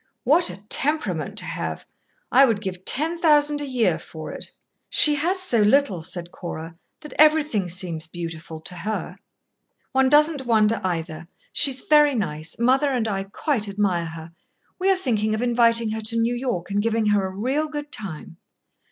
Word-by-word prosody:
"What 325 Hz, +7 st, +3 dB
a 190 Hz, +3 st, -10 dB
temperament 300 Hz, +8 st, 0 dB
to -, -, +1 dB
have! -, -, -5 dB, 0.5 s
I 265 Hz, +3 st, +7 dB
would 225 Hz, -5 st, 0 dB
give 190 Hz, -3 st, -6 dB
ten 325 Hz, +5 st, +1 dB
thousand 295 Hz, -2 st, +3 dB
a 290 Hz, -, -4 dB
year 250 Hz, -4 st, +1 dB
for -, -, -9 dB
it." -, -, -6 dB, 0.4 s
"She 300 Hz, -, +4 dB
has 340 Hz, +6 st, 0 dB
so 250 Hz, -12 st, +1 dB
little," 210 Hz, -, +3 dB
said 175 Hz, 0 st, -7 dB
Cora, 165 Hz, -2 st, -7 dB, 0.3 s
"that 300 Hz, -, -10 dB
everything 300 Hz, -, +3 dB
seems 170 Hz, -3 st, -4 dB
beautiful 165 Hz, -1 st, -7 dB
to 180 Hz, -, -4 dB
her. 210 Hz, +5 st, -4 dB, 0.7 s
One 265 Hz, 0 st, +3 dB
doesn't 295 Hz, -2 st, +3 dB
wonder, 220 Hz, -2 st, +3 dB
either. 165 Hz, -2 st, -4 dB, 0.3 s
She's 275 Hz, -3 st, +1 dB
very 295 Hz, -2 st, +4 dB
nice. 155 Hz, -7 st, -4 dB
Mother 265 Hz, +5 st, +3 dB
and 240 Hz, -4 st, 0 dB
I 195 Hz, -2 st, -2 dB
quite 215 Hz, +1 st, -2 dB
admire 195 Hz, -4 st, 0 dB
her. 160 Hz, 0 st, -9 dB, 0.5 s
We 380 Hz, +1 st, +1 dB
are 385 Hz, -, +4 dB
thinking 215 Hz, -, 0 dB
of 220 Hz, -, -3 dB
inviting 230 Hz, -2 st, +2 dB
her 220 Hz, 0 st, -3 dB
to 225 Hz, +1 st, 0 dB
New 230 Hz, +1 st, +1 dB
York 240 Hz, -8 st, -3 dB
and 200 Hz, +1 st, +1 dB
giving 225 Hz, 0 st, 0 dB
her 205 Hz, -1 st, +2 dB
a 190 Hz, 0 st, -9 dB
real 270 Hz, +8 st, 0 dB
good 295 Hz, -1 st, -6 dB
time." 170 Hz, -4 st, -5 dB
225 Hz, 175 wpm, -23 LUFS, 185-290 Hz, 0.7 s, I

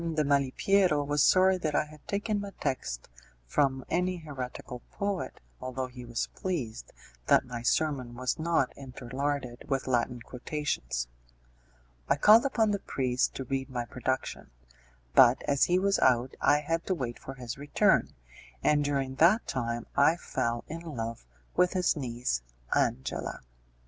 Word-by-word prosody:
de 155 Hz, -, +2 dB
Malipiero 145 Hz, +4 st, +2 dB
was 145 Hz, 0 st, +1 dB
sorry 185 Hz, +3 st, +5 dB
that 155 Hz, -4 st, -1 dB
I -, -, +2 dB
had 150 Hz, 0 st, -16 dB
taken 205 Hz, +1 st, -1 dB
my 200 Hz, -, -5 dB
text -, -, -3 dB, 0.4 s
from 135 Hz, -, +1 dB
any 180 Hz, +2 st, 0 dB
heretical 130 Hz, -5 st, -7 dB
poet, 200 Hz, -2 st, -3 dB, 0.2 s
although 130 Hz, 0 st, -3 dB
he 125 Hz, -1 st, -10 dB
was 120 Hz, 0 st, -2 dB
pleased 140 Hz, -12 st, -4 dB, 0.4 s
that -, -, +5 dB
my 120 Hz, -2 st, -6 dB
sermon 130 Hz, -1 st, 0 dB
was 130 Hz, +5 st, -2 dB
not 160 Hz, -5 st, +1 dB
interlarded 130 Hz, 0 st, -4 dB
with 135 Hz, -1 st, 0 dB
Latin 125 Hz, -1 st, 0 dB
quotations. 120 Hz, -, -3 dB, 1.0 s
I -, -, +5 dB
called 215 Hz, -, +7 dB
upon 225 Hz, -5 st, +2 dB
the 200 Hz, -, 0 dB
priest 125 Hz, -5 st, 0 dB
to 135 Hz, -, -3 dB
read 135 Hz, +1 st, -3 dB
my 120 Hz, -2 st, -3 dB
production; 130 Hz, +2 st, -3 dB, 0.6 s
but -, -, +6 dB
as 140 Hz, -1 st, +3 dB
he 180 Hz, -, +2 dB
was 195 Hz, +1 st, +2 dB
out 125 Hz, 0 st, +3 dB
I 150 Hz, -, +4 dB
had 165 Hz, +3 st, -1 dB
to 185 Hz, -, +1 dB
wait 120 Hz, -6 st, -4 dB
for 135 Hz, -, -8 dB
his 125 Hz, 0 st, -6 dB
return, 145 Hz, +1 st, +2 dB, 0.5 s
and 150 Hz, -1 st, +4 dB
during 135 Hz, -2 st, -1 dB
that 185 Hz, -, +5 dB
time 120 Hz, -2 st, -2 dB
I 140 Hz, +4 st, +5 dB
fell 120 Hz, -8 st, -2 dB
in 165 Hz, -, -5 dB
love 115 Hz, -, -5 dB, 0.3 s
with 180 Hz, +1 st, +3 dB
his 180 Hz, -3 st, +2 dB
niece, 120 Hz, -, -2 dB, 0.3 s
Angela. 125 Hz, +3 st, -1 dB
135 Hz, 150 wpm, -29 LUFS, 125-165 Hz, 1.0 s, called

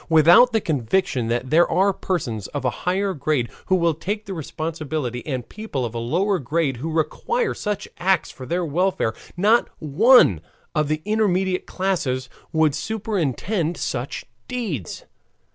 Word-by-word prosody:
Without 170 Hz, +10 st, +7 dB
the 225 Hz, -, +2 dB
conviction 140 Hz, -3 st, 0 dB
that 120 Hz, +2 st, -2 dB
there 170 Hz, +2 st, +5 dB
are 190 Hz, +4 st, +3 dB
persons 120 Hz, -, -3 dB
of 145 Hz, -3 st, -5 dB
a -, -, +4 dB, 0.2 s
higher 195 Hz, +1 st, 0 dB
grade 140 Hz, -5 st, -1 dB, 0.2 s
who 185 Hz, -, +4 dB
will 170 Hz, -2 st, +2 dB
take 205 Hz, +7 st, -4 dB
the 195 Hz, -, -5 dB
responsibility, 155 Hz, -5 st, -4 dB
and 130 Hz, -5 st, -3 dB
people 205 Hz, -, -4 dB
of 115 Hz, -, -5 dB
a 115 Hz, -, -3 dB
lower 180 Hz, -, +1 dB
grade 145 Hz, -1 st, -1 dB
who 155 Hz, +7 st, -4 dB
require 455 Hz, -, 0 dB
such 205 Hz, -2 st, -3 dB
acts 185 Hz, 0 st, +1 dB
for 130 Hz, -1 st, -10 dB
their 175 Hz, +5 st, 0 dB
welfare, 170 Hz, -7 st, 0 dB, 0.2 s
not 215 Hz, +6 st, +3 dB
one 155 Hz, -, +5 dB, 0.3 s
of 150 Hz, -2 st, +1 dB
the 155 Hz, +1 st, -2 dB
intermediate 190 Hz, -4 st, +1 dB
class 190 Hz, -5 st, -1 dB, 0.4 s
would 160 Hz, -2 st, +3 dB
superintend 190 Hz, -, -2 dB
such 130 Hz, +1 st, -3 dB, 0.2 s
deeds. 200 Hz, -, -4 dB
165 Hz, 150 wpm, -22 LUFS, 140-195 Hz, 0.4 s, Without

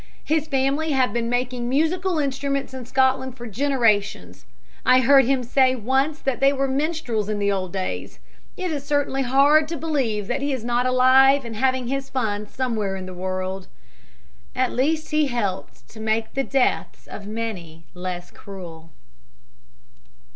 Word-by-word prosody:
His 310 Hz, 0 st, 0 dB
family 280 Hz, +3 st, 0 dB
have 260 Hz, -2 st, +2 dB
been 235 Hz, -1 st, -1 dB
making 245 Hz, 0 st, -1 dB
musical 335 Hz, +6 st, +1 dB
instruments 275 Hz, -1 st, -2 dB
in 255 Hz, -2 st, -7 dB
Scotland 260 Hz, 0 st, +1 dB
for 240 Hz, -, -8 dB
generations. 215 Hz, -, 0 dB, 0.4 s
I 255 Hz, 0 st, +5 dB
heard 270 Hz, +1 st, +6 dB
him 260 Hz, 0 st, +1 dB
say 260 Hz, +1 st, +3 dB
once 265 Hz, +6 st, 0 dB
that 270 Hz, -3 st, -1 dB
they 275 Hz, 0 st, +5 dB
were 275 Hz, -1 st, 0 dB
minstrels 270 Hz, -7 st, -1 dB
in 210 Hz, -, -1 dB
the 200 Hz, 0 st, +1 dB
old 185 Hz, -2 st, -2 dB
days. 190 Hz, -1 st, -4 dB, 0.4 s
It 365 Hz, -3 st, -2 dB
is 290 Hz, -3 st, -3 dB
certainly 285 Hz, -2 st, 0 dB
hard 280 Hz, +4 st, +4 dB
to 330 Hz, +1 st, -4 dB
believe 260 Hz, -9 st, -1 dB
that 245 Hz, +6 st, -2 dB
he 285 Hz, 0 st, -1 dB
is 245 Hz, -3 st, -4 dB
not 245 Hz, +1 st, +1 dB
alive 260 Hz, +2 st, +5 dB
and 230 Hz, -1 st, -6 dB
having 260 Hz, +2 st, +1 dB
his 275 Hz, +2 st, -3 dB
fun 210 Hz, -5 st, -2 dB
somewhere 220 Hz, -6 st, -2 dB
in 190 Hz, -1 st, -6 dB
the 185 Hz, -, -8 dB
world." 185 Hz, +1 st, -4 dB, 0.9 s
At 255 Hz, -1 st, +1 dB
least 310 Hz, +5 st, 0 dB
he 305 Hz, -1 st, +2 dB
helped 210 Hz, -7 st, -4 dB
to 220 Hz, -, -13 dB
make 220 Hz, 0 st, -1 dB
the 270 Hz, -, 0 dB
deaths 270 Hz, -1 st, 0 dB
of 200 Hz, -, -9 dB
many 190 Hz, -8 st, -6 dB
less 180 Hz, -1 st, -6 dB
cruel. 170 Hz, -5 st, -10 dB
255 Hz, 160 wpm, -23 LUFS, 210-275 Hz, 0.9 s, heard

